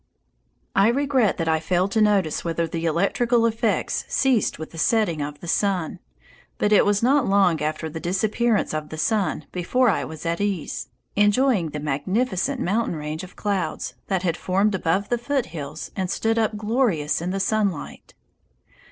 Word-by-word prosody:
I 195 +2 +5
regret 260 -3 +2
that 165 - -2
I 160 0 +2
failed 180 +4 0
to 220 - +2
notice 200 -7 +2
whether 170 0 -1
the 165 +1 -4
electrical 230 +8 +2
effects 225 0 0
ceased 260 -6 +1
with 160 - -8
the 165 - -8
setting 205 -7 +2
of 145 0 -5
the 175 - -8
sun, 185 -2 0 0.6
but 210 - +1
it 205 - +5
was 205 +1 +2
not 265 0 +3
long 190 -5 +3
after 155 +1 -2
the 160 +1 -6
disappearance 210 +6 0
of 155 -1 -3
the 155 - -7
sun 195 -2 0
before 240 +8 +2
I 195 - +1
was 160 +1 -8
at 170 +3 -1
ease, 200 -5 -2 0.3
enjoying 205 -3 +3
the 150 - -5
magnificent 190 - -1
mountain 210 -1 0
range 155 +2 -5
of 185 - -11
clouds 200 -3 -2
that 190 -2 -1
had 170 -2 0
formed 195 +3 +1
above 190 +2 0
the 240 - 0
foothills 165 - -4
and 190 -2 -2
stood 225 +4 0
up 220 -1 0
glorious 210 - 0
in 175 - -2
the 195 +1 -2
sunlight. 200 -4 -2
195 Hz, 170 wpm, -23 LUFS, 165-220 Hz, 0.6 s, I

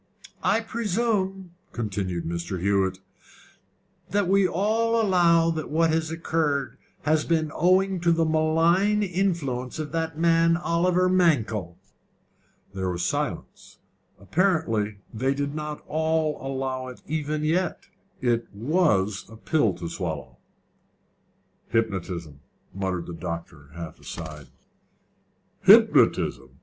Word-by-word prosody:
"I 225 - +2
presume," 205 -4 -1 0.2
continued 100 -6 -3
Mr. 85 +2 -3
Hewett, 95 0 +1 1.1
"that 205 -2 +1
we 195 0 +4
all 225 +6 +1
allow 170 -5 +4
that 155 -2 -4
what 165 +1 +2
has 160 0 0
occurred 160 -4 -1 0.2
has 155 0 +2
been 160 -2 0
owing 185 +2 +2
to 170 -1 +3
the 165 0 +2
malign 165 +6 +2
influence 170 -10 -1
of 155 -2 -5
the 165 0 -1
man 165 +1 +3
Oliver 180 +1 +2
Mankell?" 120 - +1 1.0
There 95 -1 -2
was 90 -1 -2
silence. - - -4 0.4
Apparently 110 - 0 0.2
they 130 +5 0
did 140 0 -2
not 150 0 -5
all 160 -1 0
allow 130 -1 -3
it 125 - -11
even 155 0 -2
yet: 175 +4 0 0.4
it 120 -2 +1
was 105 - +1
a 110 - -12
pill 115 - +1
to 85 -1 -6
swallow. 75 -8 -5 1.3
"Hypnotism," 90 -9 -2 0.3
muttered 95 -3 -2
the 85 - -7
doctor, 85 -4 -7
half 85 -2 -8
aside. 75 -3 -8 1.1
"Hypnotism! 65 +2 +4
155 Hz, 115 wpm, -25 LUFS, -, 1.3 s, we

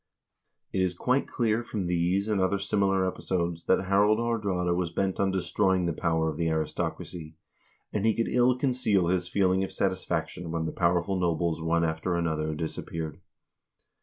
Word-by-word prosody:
It 95 - +1
is 90 -1 0
quite 125 +6 +1
clear 115 -1 0
from 105 -5 -3
these 90 +3 +1
and 105 -3 +1
other 95 +2 +2
similar 95 -1 +1
episodes 85 -2 -2
that 95 0 +2
Harald 100 +3 +4
Ilaardraade 100 -7 0
was 90 -1 -1
bent 95 +2 -1
on 100 - +2
destroying 95 0 +1
the 85 - 0
power 80 0 0
of 75 -2 -3
the 85 0 0
aristocracy, 80 +1 -3 0.6
and 105 - -1
he 110 -1 +3
could 115 - 0
ill 125 +1 +3
conceal 125 -9 +1
his 90 -1 0
feeling 95 -1 +2
of 95 - -4
satisfaction 90 -3 -2
when 80 0 -2
the - - -2
powerful 90 +2 +1
nobles 85 -2 0
one 85 +1 +1
after 80 +2 -1
another 80 -2 -1
disappeared. 80 0 -5
90 Hz, 165 wpm, -28 LUFS, 85-100 Hz, 0.6 s, Harald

